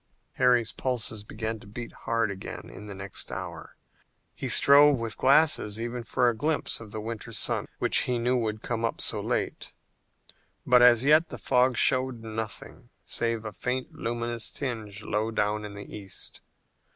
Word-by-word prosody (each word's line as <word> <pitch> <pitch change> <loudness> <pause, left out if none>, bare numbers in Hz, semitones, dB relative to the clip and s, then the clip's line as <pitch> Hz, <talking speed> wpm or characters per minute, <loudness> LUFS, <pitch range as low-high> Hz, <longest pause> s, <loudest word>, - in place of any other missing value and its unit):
Harry's 125 -3 +3
pulses 115 -5 -1
began 110 +1 -4
to 105 - -15
beat 115 +3 -8
hard 115 -3 +1
again 95 -1 -8
in 105 - -10
the 100 - -7
next 95 0 -5
hour. - - -6 0.6
He - - -4
strove 145 0 +6
with 115 -1 -3
glasses 135 -6 +4
even 120 +1 -4
for 125 +1 +1
a 120 - +2
glimpse 150 +7 -1
of 115 -2 -10
the 110 - -6
winter 115 +1 -6
sun - - -1
which - - +3
he 125 -1 +1
knew 120 +2 +1
would 110 -3 -2
come 115 -1 -1
so - - +1
late, - - -2 0.9
but 125 0 +6
as 120 -1 +7
yet 155 +4 +5
the - - -7
fog 125 -1 +2
showed 130 -3 +2
nothing 110 -1 -7 0.2
save 115 -1 -1
a 110 - -5
faint 125 +6 -3
luminous 120 0 -3
tinge 110 -6 -5
low 110 +1 -1
down 105 -1 -1
in 105 -1 -8
the 100 - -8
east. 100 -3 -8
115 Hz, 165 wpm, -27 LUFS, 110-125 Hz, 0.9 s, as